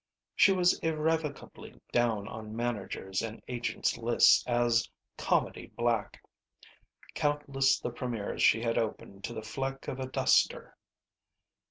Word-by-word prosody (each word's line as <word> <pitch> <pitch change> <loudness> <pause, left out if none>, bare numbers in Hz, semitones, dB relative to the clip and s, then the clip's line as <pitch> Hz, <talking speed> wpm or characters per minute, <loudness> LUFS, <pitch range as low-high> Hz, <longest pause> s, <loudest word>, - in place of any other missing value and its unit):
She 195 - +6
was 180 -2 +3
irrevocably 160 -2 -3
down 115 -4 +1
on 110 -1 -8
managers' 105 -5 -3
and 115 -1 -6
agents' 120 -1 -2
lists 120 0 +5
as 120 -1 +2 0.3
"comedy - - -1
black." 115 -3 -1 0.9
Countless 140 -2 +1
the 120 - -4
premiers 120 -4 -4
she 115 +1 +4
had 115 0 +1
opened 100 -3 -5
to 120 - -6
the 110 - -5
fleck 135 +4 -4
of 130 - -4
a 130 - -3
duster! 130 - +1
120 Hz, 125 wpm, -30 LUFS, 110-135 Hz, 0.9 s, She